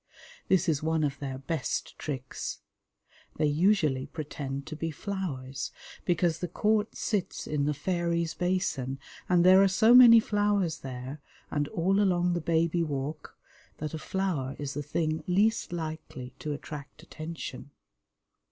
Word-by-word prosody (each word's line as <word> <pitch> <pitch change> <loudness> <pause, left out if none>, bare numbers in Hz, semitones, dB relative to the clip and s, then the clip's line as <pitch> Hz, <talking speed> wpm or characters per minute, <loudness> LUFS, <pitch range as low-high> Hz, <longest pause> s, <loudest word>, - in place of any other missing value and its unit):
This 185 0 +3
is 155 -4 +1
one 160 0 +1
of 140 -2 -1
their 135 -2 -4
best 140 +1 -3
tricks. 130 -4 -5 0.7
They - - +1
usually 150 -4 +2
pretend 140 -3 -5
to 155 - -6
be 165 +2 -3
flowers, 150 -7 -4 0.3
because 175 -2 +1
the 180 - -2
court 210 +4 +1
sits 205 -5 -2
in 145 -2 0
the 150 - +1
Fairies' 170 +1 -1
Basin, 175 -8 -1 0.3
and 175 -1 +4
there 185 +1 +8
are 195 - +6
so 220 +5 +5
many 240 -2 +10
flowers 205 -6 +1
there, 130 +2 -7 0.3
and 145 0 0
all 190 +6 +1
along 180 -3 +2
the 175 - -1
Baby 165 +1 +1
Walk, 145 -1 -4 0.4
that 155 +1 -5
a 160 - -4
flower 160 -9 -2
is 145 -1 -4
the 145 - -3
thing 155 +2 -1
least 205 +4 +2
likely 155 -6 -6
to 150 - -4
attract 145 +1 -8
attention. 155 -4 -7
160 Hz, 145 wpm, -29 LUFS, 145-185 Hz, 0.7 s, many